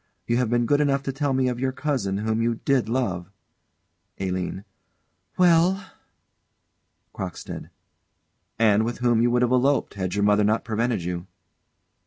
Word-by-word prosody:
You 120 - +1
have 125 -3 +1
been 120 0 +2
good 145 +4 +2
enough 140 -2 +1
to 135 - -2
tell 140 +1 -1
me 130 -1 +1
of 125 -1 -2
your 130 0 0
cousin, 130 -9 -2
whom 110 +2 -1
you 115 0 +1
did 130 -5 +2
love 100 -8 -1 0.9
ALINE. 95 0 -3 0.7
Well? 180 +2 +3 1.2
CROCKSTEAD. - - -7 0.9
And 110 -1 +4
with 120 +1 -3
whom 120 -2 +2
you 120 - +3
would 120 +1 +2
have 125 - +1
eloped, 135 +2 +2
had 95 -2 -3
your 100 - +1
mother 105 0 +4
not 110 +2 +1
prevented 115 -3 -1
you. 90 +1 -4
120 Hz, 155 wpm, -24 LUFS, 105-135 Hz, 1.2 s, And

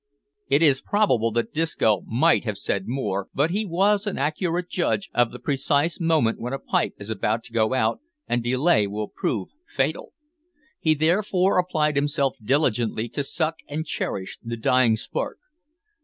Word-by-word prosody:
It 145 - +3
is 140 -4 +4
probable 130 - +2
that 120 0 -1
Disco 150 - +1
might 155 +9 +3
have 105 -4 -3
said 100 0 -2
more, 105 -6 -2
but 150 +5 +2
he 210 +3 -1
was 200 +4 +2
an 205 - -2
accurate 170 +5 -1
judge 185 +2 -1
of 120 -1 +3
the 125 - -9
precise 145 +5 0
moment 160 -9 +2
when 125 +3 -4
a - - -1
pipe - - -1
is 100 +2 -7
about 110 +2 -1
to 120 -1 -13
go 110 +2 +2
out, 110 -2 +1 0.3
and 120 - 0
delay 125 -3 +2
will 105 +1 -4
prove 105 -5 -2 0.2
fatal. - - -2 0.7
He 155 -1 +2
therefore 185 +4 +2
applied 155 -4 +1
himself 140 -2 +1
diligently 120 -3 +1
to 135 +5 -3
suck 160 +3 -1
and 155 +2 -3
cherish 95 -10 -4
the 115 0 -4
dying 120 0 +3
spark. - - -4
140 Hz, 165 wpm, -24 LUFS, 115-165 Hz, 0.7 s, is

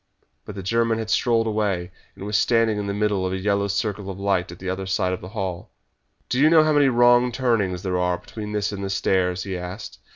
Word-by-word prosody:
But 105 - -8
the 95 - -6
German 115 +3 +1
had 110 -1 -4
strolled 115 -2 +2
away, 100 -5 -1 0.2
and 100 - -8
was 105 0 -2
standing 115 -1 +2
in 100 - -3
the - - -1
middle 105 -2 0
of 95 0 -1
a - - -1
yellow 100 +1 0
circle 100 0 -2
of 95 0 -7
light 95 -3 0
at 85 - -10
the 95 - -8
other 95 +1 -3
side 95 -1 0
of 90 - -5
the 90 - -8
hall. 95 -4 -5 0.6
"Do 125 - -1
you 150 +3 +6
know 160 -1 +6
how 155 0 +2
many 145 -1 +4
wrong 120 0 +4
turnings 115 -8 0
there 90 -2 -1
are 90 0 +1
between 105 +2 -8
this 105 -1 -1
and 100 -1 -5
the 95 - -3
stairs?" 95 -1 0
he 95 -2 -4
asked. 90 +4 -7
100 Hz, 240 wpm, -23 LUFS, 95-115 Hz, 0.6 s, you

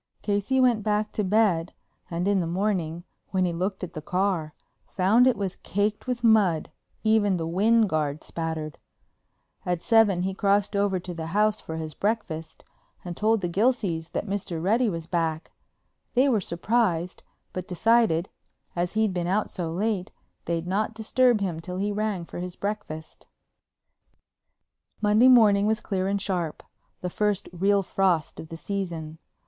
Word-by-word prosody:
Casey 205 +6 +1
went 245 -4 +4
back 210 0 0
to 210 - -1
bed 185 -4 +2 0.4
and 175 +2 -2
in 200 -1 +3
the 170 - -1
morning, 175 -3 -1 0.3
when 185 -1 +1
he 175 - -1
looked 185 +3 -3
at 180 - -5
the 155 - -6
car, 180 -3 -1 0.3
found 215 +7 +4
it 255 - +3
was 195 -2 -3
caked 205 +4 -2
with 245 -1 -2
mud, 205 -8 +3 0.3
even 215 -3 +3
the 165 - -3
wind 215 +6 +3
guard 155 -3 -1
spattered. 160 -2 -4 0.8
At 180 -1 -2
seven 215 -6 +4
he 190 +1 -1
crossed 200 +1 +1
over 200 -2 +1
to 180 0 -7
the 165 -1 -5
house 215 0 +2
for 160 - -6
his 160 -1 -5
breakfast 190 -5 -3 0.4
and 175 -1 -5
told 220 +2 +2
the 175 - -1
Gilseys 185 -4 0
that - - -2
Mr. 195 -4 -3
Reddy 220 +7 +2
was 165 -4 -4
back. 165 -2 -2 0.6
They 260 +3 +5
were 230 -7 +2
surprised, 180 -1 0 0.3
but 185 -1 -5
decided, 195 -2 +2 0.5
as 175 +1 -1
he'd 215 -2 +1
been 175 -1 -2
out 200 +4 0
so 170 -4 -4
late, 195 +1 -1 0.4
they'd 170 0 -2
not 205 +4 -1
disturb 230 +1 +2
him 175 -5 -2
till 180 +2 -6
he 205 +2 -1
rang 205 -4 -2
for - - -8
his 180 0 -5
breakfast. 200 -7 -6 1.7
Monday 215 +4 +5
morning 210 -5 +6
was 220 +1 +1
clear 190 -3 -2
and 200 +1 0
sharp, 180 -5 -2 0.4
the 180 - -2
first 210 0 0
real 195 +3 +2
frost 180 -4 0
of 160 - -8
the 165 - -7
season. 165 -5 -4
195 Hz, 165 wpm, -26 LUFS, 170-215 Hz, 1.7 s, morning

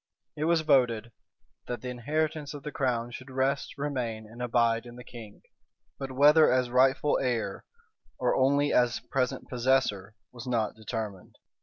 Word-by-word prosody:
It 150 - -2
was 165 0 +3
voted, 120 -6 +2 0.6
"That 120 -3 -4
the 125 - -5
inheritance 150 +4 -2
of 145 - -9
the 150 - -5
crown 120 -4 -1
should 130 +2 -9
rest, 135 +2 -1
remain, 125 -6 -3
and 115 +3 -11
abide 115 -1 +1
in 120 - -11
the 125 - -10
king:" 110 -5 -12 0.3
[] - - -49
but 135 -1 -5
whether 150 +4 +6
as 125 -1 +1
rightful 135 +3 +3
heir, 125 -4 -2 0.5
or - - +1
only 140 +2 +3
as 120 -1 +3
present 130 -2 -2
possessor, 120 -5 0 0.2
was 120 0 -10
not 115 -4 0
determined. 110 -3 -6
125 Hz, 160 wpm, -28 LUFS, 115-140 Hz, 0.6 s, whether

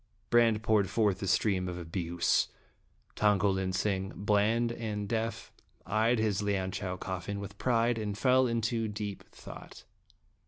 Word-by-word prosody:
Brande 115 -2 +4
poured 105 -4 +2
forth 100 -3 +1
a 100 - -2
stream 95 -2 +1
of 90 -1 -4
abuse. 85 0 0 0.7
Tong 105 -1 +3
ko 100 0 +2
lin 95 -1 -1
sing, 95 0 -1
bland 105 +4 +2
and 105 -3 -4
deaf, 115 0 -3 0.3
eyed 110 +3 +2
his 110 -2 0
Lianchau 95 -2 -2
coffin 95 +2 -4
with 100 0 -8
pride, 120 -1 +2
and 105 -2 -3
fell 130 +2 +4
into 115 -1 0
deep 105 -1 -5
thought. - - -11
105 Hz, 145 wpm, -30 LUFS, 95-115 Hz, 0.7 s, Brande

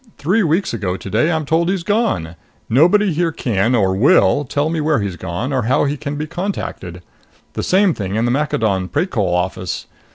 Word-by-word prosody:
Three 190 +10 +1
weeks 170 -1 0
ago 95 -5 -2
today 110 - 0
I'm 160 -2 -1
told 165 +4 +1
he's 190 -2 -1
gone. 135 - -1 0.3
Nobody 180 - +4
here 165 +1 0
can, 115 -4 0
or 95 -4 +2
will, 145 - +4
tell 145 +3 -1
me 165 -2 -1
where 150 -2 +1
he's 100 -3 -3
gone 95 +10 -4
or 130 - +1
how 125 - +2
he 145 0 0
can 145 0 -5
be 150 +1 -3
contacted. 150 - -5 0.5
The - - -3
same 190 -1 +3
thing 100 -4 -4
in 110 +2 +1
the 120 - +1
Maccadon 110 -9 0
Precol 105 - -1
office. 90 +1 -2
140 Hz, 190 wpm, -18 LUFS, -, 0.5 s, Nobody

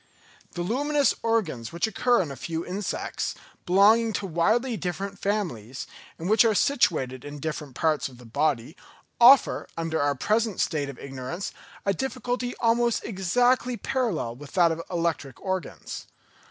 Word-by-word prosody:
The 175 - -3
luminous 285 +8 +2
organs 175 - -1
which 170 +4 0
occur 235 0 +2
in 150 - -7
a - - -6
few 165 +5 -4
insects, 195 +3 -3 0.3
belonging 215 +5 +5
to 200 - -2
widely 220 +9 +1
different 195 +2 -4
families, 160 - -2 0.3
and 165 - -5
which 215 +2 +6
are 225 -2 +3
situated 135 - +1
in 145 0 -7
different 150 -3 -5
parts 150 -3 +1
of 125 - -15
the 125 - -14
body, 140 +3 0 0.4
offer, 250 +3 +6
under 165 -1 -1
our 145 0 +2
present 215 - 0
state 145 -3 0
of 135 - -8
ignorance, 135 +7 -6 0.3
a 200 - +2
difficulty 250 +2 -3
almost 235 0 +2
exactly 245 +5 +1
parallel 225 - -1
with 145 +2 -12
that 175 -3 +4
of 165 - -3
the 165 - -7
electric 165 -6 -2
organs. 190 -4 -5
180 Hz, 155 wpm, -26 LUFS, 150-230 Hz, 0.4 s, which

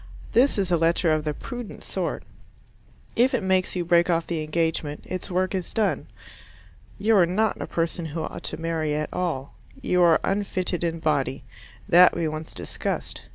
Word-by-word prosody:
This 255 +2 +4
is 190 -3 0
a 170 - +4
letter 165 0 +3
of 155 0 -1
the 150 - 0
prudent 245 - -7
sort. - - -3 0.9
If 255 +3 +3
it 225 - -1
makes 190 -1 +1
you 175 -1 -1
break 170 +1 +4
off 170 -1 +2
the 165 -2 -2
engagement, 155 -1 -1
its 185 - -5
work 185 +1 0
is 185 -2 -3
done. 215 -3 0 0.9
You 215 +2 +3
are 175 -3 +5
not 215 +5 0
a - - -4
person 165 0 -2
who 160 +1 -4
ought - - -6
to - - -3
marry 160 -2 -1
at 155 0 -3
all. 155 -7 -2 0.3
You 180 -9 +1
are 170 -2 +6
unfitted 190 -3 -1
in 165 -1 -2
body: 140 -3 0 0.4
that 180 +1 +7
we 170 -1 0
once 155 +1 -6
discussed. - - -4
170 Hz, 180 wpm, -25 LUFS, 160-185 Hz, 0.9 s, that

